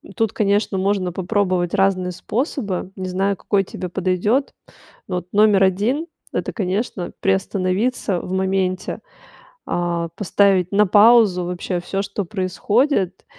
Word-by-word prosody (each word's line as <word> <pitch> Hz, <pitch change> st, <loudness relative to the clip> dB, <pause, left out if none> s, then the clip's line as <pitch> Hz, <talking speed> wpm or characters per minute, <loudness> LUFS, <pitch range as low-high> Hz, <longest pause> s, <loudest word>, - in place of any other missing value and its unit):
тут, 225 Hz, -3 st, 0 dB
конечно, 205 Hz, -1 st, +1 dB
можно 190 Hz, -1 st, 0 dB
попробовать 185 Hz, -1 st, 0 dB
разные 185 Hz, -2 st, +1 dB
способы. 205 Hz, -, -3 dB
Не 185 Hz, -1 st, -5 dB
знаю, 195 Hz, +2 st, 0 dB
какой 200 Hz, -2 st, +1 dB
тебе 180 Hz, -1 st, -6 dB
подойдёт. 190 Hz, +9 st, 0 dB, 0.6 s
Ну, 180 Hz, -, -2 dB
вот 180 Hz, 0 st, -5 dB
номер 205 Hz, -2 st, +5 dB
1- 220 Hz, -, 0 dB, 0.3 s
это, -, -, -2 dB
конечно, 195 Hz, -2 st, -3 dB
приостановиться 195 Hz, +1 st, 0 dB
в 180 Hz, -, -6 dB
моменте, 190 Hz, -1 st, -1 dB, 0.7 s
а, 175 Hz, -1 st, -1 dB
поставить 195 Hz, -2 st, +2 dB
на 205 Hz, 0 st, +4 dB
паузу 205 Hz, -2 st, +5 dB
вообще 180 Hz, +1 st, -3 dB
всё, 195 Hz, +2 st, -3 dB
что 200 Hz, +1 st, -3 dB
происходит. 190 Hz, -, 0 dB
195 Hz, 125 wpm, -20 LUFS, 185-205 Hz, 0.7 s, номер